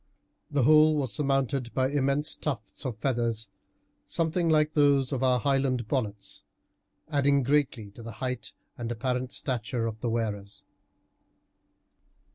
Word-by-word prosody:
The 145 -3 +1
whole 155 +3 +6
was 135 -7 -1
surmounted 135 -3 0
by 130 0 +2
immense 145 +1 +1
tufts 130 -2 -4
of 120 -5 -4
feathers, 115 -4 -1 0.6
something 165 +1 0
like 155 -1 +3
those 140 -3 +3
of 135 -3 -1
our 130 -1 +3
Highland 135 -2 +1
bonnets, 105 -6 -3 0.7
adding 140 -2 +3
greatly 130 -6 +1
to 115 - -12
the 115 -1 -7
height 125 +3 -4 0.3
and 120 0 -3
apparent 125 +2 -2
stature 120 -2 -2
of 110 -1 -4
the 120 - -2
wearers. 105 -3 -3
130 Hz, 130 wpm, -28 LUFS, 115-140 Hz, 0.7 s, whole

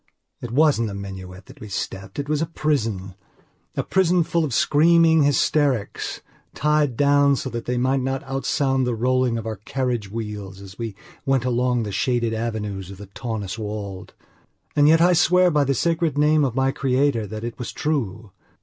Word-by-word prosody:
It 120 - -5
wasn't 130 -3 +3
a 100 - -6
minuet 95 -1 -8
that 135 +3 -15
we 110 - -9
stepped; 95 -1 -5
it 145 0 -3
was 150 0 0
a 165 - 0
prisona 115 - -1 0.8
prison 180 -2 +3
full 170 +1 0
of 150 - -2
screaming 160 +5 +4
hysterics, 140 -4 +1 0.3
tied 150 -4 +1
down 145 0 +4
so 130 0 -4
that 115 -1 -5
they 125 0 -1
might 130 +2 +1
not 135 +1 -2
outsound 135 -1 0
the 120 - 0
rolling 125 0 +1
of 115 - -5
our 110 -1 -4
carriage 120 -1 -3
wheels 105 -3 -6
as 100 +1 -12
we 115 -4 -4 0.3
went 135 -2 +1
along 125 -1 +1
the 105 - -4
shaded 120 +3 0
avenues 105 -4 -4
of 100 - -9
the 100 0 -11
Taunus 110 -4 -4
Wald. 105 -3 -6 0.6
And 145 -1 +5
yet 160 +1 +5
I 180 +1 +5
swear 180 +2 +4
by 150 -2 +2
the 135 0 +1
sacred 165 0 0
name 150 +1 +4
of 130 -4 -1
my 135 0 +2
creator 135 -4 +1
that 110 +2 -7
it 120 +2 -6
was 125 - -4
true. 110 -9 -3
125 Hz, 180 wpm, -23 LUFS, 110-145 Hz, 0.8 s, And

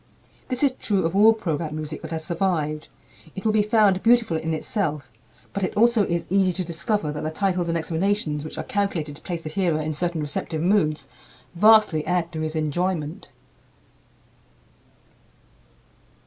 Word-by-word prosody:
This 255 +1 -1
is 280 - +4
true 195 -5 0
of 165 +3 -1
all 215 +3 +7
program 160 -8 -3
music 155 0 -5
that 160 - -7
has 160 -1 -4
survived. 160 -3 -1 0.5
It 190 - -7
will 220 - +4
be 215 0 +3
found 210 -3 +3
beautiful 230 -6 +3
in 160 0 -2
itself; 155 - -2 0.4
but 200 - -3
it 185 - -2
also 230 -1 +4
is 170 0 -1
easy 190 0 +2
to 185 - -1
discover 170 0 -1
that 150 - -5
the 155 - -2
titles 180 0 -1
and 165 - +1
explanations 165 -2 -1
which 155 - -7
are - - -3
calculated 195 - -2
to - - -19
place 170 -2 -5
the 155 - -5
hearer 170 -3 0
in 155 0 -2
certain 170 +2 -2
receptive 150 +2 -3
moods 175 -5 +1 0.5
vastly 210 -4 +5
add 180 -1 0
to 160 -2 -4
his 155 0 -3
enjoyment. 160 +3 -2
170 Hz, 165 wpm, -24 LUFS, 155-200 Hz, 0.5 s, all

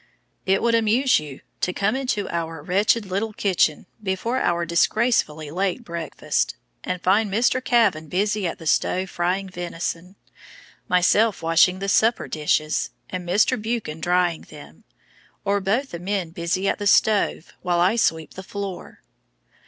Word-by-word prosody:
It 195 +1 +2
would 235 0 +2
amuse 230 +4 +3
you 145 -3 -9 0.2
to 180 - -1
come 200 +6 0
into 250 -6 -1
our 165 -2 -4
wretched 205 +5 +2
little 200 +3 -2
kitchen 185 -7 +1 0.2
before 210 +6 -1
our 170 0 0
disgracefully 170 -4 +1
late 190 +6 -1
breakfast, 170 -5 -2 0.3
and 180 - -3
find 200 +2 +2
Mr. 245 +4 +1
Kavan 225 -12 +2
busy 205 +2 0
at 165 - -4
the 165 - -12
stove 185 +4 +1
frying 185 +3 -1
venison, 175 0 -5 0.7
myself 185 +3 +3
washing 165 +3 +4
the 195 +1 -4
supper 225 +3 +2
dishes, 155 0 0 0.2
and 180 -1 -5
Mr. 205 +3 +2
Buchan 220 -8 -3
drying 175 -1 +1
them, 145 - -14 0.6
or 200 0 +1
both 230 +9 0
the 170 - -6
men 185 -2 -2
busy 175 +2 -2
at - - 0
the 205 - -1
stove 205 -5 +2
while 175 -1 0
I 185 +6 +3
sweep 160 -9 0
the 190 - -8
floor. 195 -1 -7
185 Hz, 150 wpm, -23 LUFS, 170-210 Hz, 0.7 s, washing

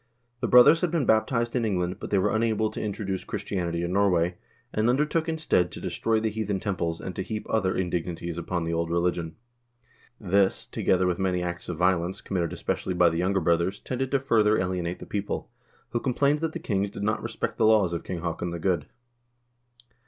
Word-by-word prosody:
The 120 - -1
brothers 125 +7 +7
had 180 - +1
been 160 -5 0
baptized 115 +2 +2
in 120 - +1
England, 90 -4 -1
but - - -6
they 100 - +2
were 95 - +2
unable 110 -1 +1
to - - -5
introduce 100 -2 -3
Christianity 85 -3 -3
in 85 +1 -2
Norway, 90 -3 +2 0.4
and 110 +2 +2
undertook, 150 +5 +1
instead, 155 - +1
to - - -7
destroy 115 -1 0
the 110 0 -1
heathen 105 -2 -2
temples, 85 -5 -2
and 95 - -6
to - - -2
heap 105 +3 -4
other 95 -4 +1
indignities 85 -1 -2
upon 85 0 -2
the 85 0 -2
old 85 0 -1
religion. 85 -1 -1 0.8
This, 100 -1 +2
together 95 0 +1
with 90 0 0
many 90 -2 0
acts 85 0 -5
of 85 - -3
violence, 90 +1 +1
committed 90 -4 -2
especially 90 - -2
by 90 -1 +5
the 80 0 -2
younger 95 +2 +1
brothers, 85 +4 +1
tended 130 +1 -3
to 140 - +2
further 110 -5 +3
alienate 90 -1 -2
the - - -9
people, 100 0 -4 0.4
who 120 - 0
complained 140 +4 +1
that 160 0 -2
the - - -3
kings 100 -2 -1
did 100 - -7
not 110 +1 0
respect - - -4
the - - +5
laws 105 -6 +4
of 85 - -3
King 90 -3 -5
Haakon 85 0 -3
the 85 - -4
Good. 85 -4 0
95 Hz, 200 wpm, -26 LUFS, 85-110 Hz, 0.8 s, brothers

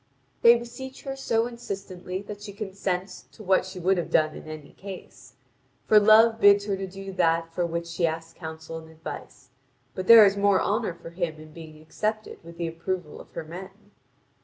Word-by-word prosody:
They 235 0 +8
beseech 245 +3 -9
her 270 -1 -4
so 230 -4 0
insistently 195 -5 -6
that 205 0 -9
she 205 -1 -8
consents 190 -2 -4
to 215 - -12
what 190 -1 +2
she 185 0 -8
would 185 +2 +2
have 175 - -4
done 155 -1 +2
in - - -10
any 155 -2 -9
case. 195 -2 -11 0.5
For 215 - +7
Love 220 +2 +6
bids 200 -1 +6
her 200 -2 -1
do 195 0 -7
that 165 -2 +1
for 175 0 0
which 170 0 -3
she 170 0 0
asks 165 +1 -5
counsel 160 -1 -8
and 160 0 -14
advice; 160 -5 -9 0.4
but 185 0 -5
there 230 -2 +10
is 200 0 +3
more 200 -1 +3
honour 210 -3 -1
for 165 - -11
him 170 -2 -3
in 155 0 -13
being 155 -2 -11
accepted 215 +6 -4
with 170 0 -12
the 170 -1 -2
approval 165 0 -4
of - - -16
her - - -5
men. 190 +5 -11
185 Hz, 190 wpm, -26 LUFS, 165-205 Hz, 0.5 s, there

